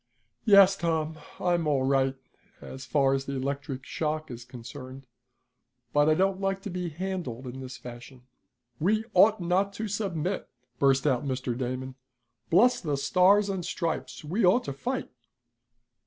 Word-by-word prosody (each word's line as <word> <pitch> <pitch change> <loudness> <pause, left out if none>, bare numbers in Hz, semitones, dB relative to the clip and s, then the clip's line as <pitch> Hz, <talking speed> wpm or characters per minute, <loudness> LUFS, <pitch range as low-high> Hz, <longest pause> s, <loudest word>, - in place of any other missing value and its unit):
"Yes, 200 -3 +7
Tom, 160 -3 -1 0.2
I'm 175 -3 +1
all 140 -3 +2
right 135 0 +2 0.4
as 130 0 -9
far 135 -2 +3
as 135 0 -1
the 140 - -4
electric 135 0 -4
shock 155 -1 -3
is 120 0 -8
concerned, 130 +2 -10 0.9
but 145 +1 +4
I 155 - +4
don't 190 +2 +1
like 195 0 0
to 200 - -5
be 180 -1 -3
handled 170 -7 -4
in 130 +1 -7
this 130 0 -7
fashion." 125 +1 -11 0.6
"We 215 +7 +1
ought 210 +4 +6
not 185 +3 +1
to 220 +2 -4
submit!" 195 -3 -2 0.3
burst 135 0 +3
out 130 -4 +2
Mr. 130 -3 -2
Damon. 130 +1 -4 0.6
"Bless 230 +9 +4
the 150 -5 -1
stars 180 +8 +4
and 190 -3 -2
stripes! 170 -1 -3
We 190 +9 -1
ought 190 +7 +5
to 140 - -4
fight." 250 - -4
155 Hz, 155 wpm, -28 LUFS, 135-190 Hz, 0.9 s, Yes